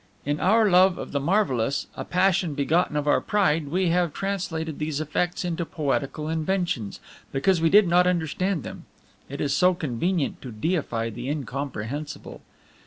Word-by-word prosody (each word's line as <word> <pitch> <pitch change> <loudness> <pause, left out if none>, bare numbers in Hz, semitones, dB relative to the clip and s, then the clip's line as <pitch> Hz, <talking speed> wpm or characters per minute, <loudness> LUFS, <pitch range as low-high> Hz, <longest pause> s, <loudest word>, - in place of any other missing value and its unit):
In 145 +1 -1
our 220 +3 +4
love 185 -1 +5
of - - -7
the 140 - 0
marvelous, 140 - +1
a - - -4
passion 180 -3 +1
begotten 150 +3 +1
of 150 0 -2
our 145 - +3
pride, 165 -7 +1
we 180 +4 +1
have 175 -2 +1
translated 170 -6 -3
these 150 -1 -2
effects 175 +4 -1
into 170 -1 -2
poetical 150 -1 -2
inventions, 160 - -2 0.3
because 165 +6 +2
we 165 - +4
did 205 +1 +6
not 180 +1 +4
understand 180 -1 0
them. - - -9 0.4
It 140 +1 -6
is 140 -1 0
so 180 0 +4
convenient 165 +1 -1
to 125 - -8
deify 115 -3 -2
the 120 +4 -6
incomprehensible! 140 0 -5
160 Hz, 160 wpm, -25 LUFS, 140-180 Hz, 0.4 s, did